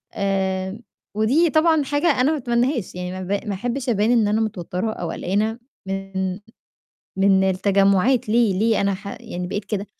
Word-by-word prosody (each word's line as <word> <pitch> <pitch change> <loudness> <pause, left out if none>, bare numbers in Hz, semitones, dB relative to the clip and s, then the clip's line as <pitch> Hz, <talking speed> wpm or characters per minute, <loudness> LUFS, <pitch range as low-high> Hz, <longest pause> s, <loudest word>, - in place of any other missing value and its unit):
آمم 190 +1 -1 0.3
ودي 270 +11 +3
طبعًا 315 -1 +3
حاجة 290 +4 0
أنا 285 +5 +3
ما 310 - 0
أتمنّاهاش، 240 - -1
يعني 180 0 -4
ما 185 0 -6
ب 200 +4 -3
ما 200 - -1
أحبّش 245 +5 -3
أبان 215 +1 +2
إن 225 -4 +3
أنا 220 +1 +1
متوتّرة 205 0 -3
أو 170 -2 -5
قلقانة 215 +5 -1 0.3
من 195 -1 -3 0.9
من 195 0 +4
التجمُّعات، 200 +5 +2
ليه 220 -5 +3
ليه 225 +1 +2
أنا 200 -1 +1
ح 200 +1 -8
يعني 180 0 -5
بقيت 205 +1 -3
كده؟ 200 0 -3
205 Hz, 170 wpm, -22 LUFS, 190-240 Hz, 0.9 s, من